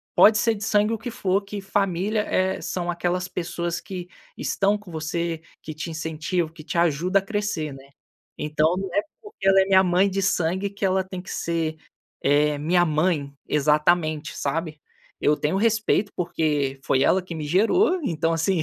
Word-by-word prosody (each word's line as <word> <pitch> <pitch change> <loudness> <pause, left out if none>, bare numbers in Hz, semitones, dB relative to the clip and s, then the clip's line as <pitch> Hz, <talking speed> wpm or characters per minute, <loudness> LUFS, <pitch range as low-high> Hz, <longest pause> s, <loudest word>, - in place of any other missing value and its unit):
Pode 215 0 +7
ser 230 +1 +2
de 205 - -7
sangue, 215 0 +2
o - - -1
que 245 - -6
for. 195 -2 0
Que 200 +1 -6
família 195 +2 0
é 190 -2 0
são 175 -1 -3
aquelas 175 +1 -1
pessoas 175 -1 -3
que 180 0 -7 0.3
estão 200 +1 +1
com 205 -4 -13
você, 165 +1 -3 0.2
que 155 - -7
te 155 +2 -5
incentivam, 160 +1 -2
que 155 -2 -12
te 170 - -4
ajuda 175 +4 +2
a - - -6
crescer, 200 -7 -2
né." 135 0 -14 0.5
Então, 155 +3 +1
não 195 0 -3
é 205 - +4 0.2
porque 415 - -8
ela 195 0 +6
é 190 - +2
minha 190 -1 +6
mãe 180 +2 +3
de 195 +1 -1
sangue 190 0 0
que 200 0 -5
ela 190 0 +2
tem 185 -1 -7
que - - -10
ser, 165 -2 -2 0.5
eh, 145 +1 +3
minha 175 +4 +3
mãe 155 -3 0
exatamente, 150 +1 +1
sabe? 155 +1 -3 0.4
Eu 150 - +3
tenho 150 +6 -1
respeito 215 -1 +2
porque 150 -6 -1
foi 135 0 +2
ela 190 +5 +3
que 180 -2 -8
me 155 -2 -4
gerou, 285 - +3
então 165 - 0
assim, 165 +1 +1
175 Hz, 185 wpm, -24 LUFS, 155-195 Hz, 0.5 s, Pode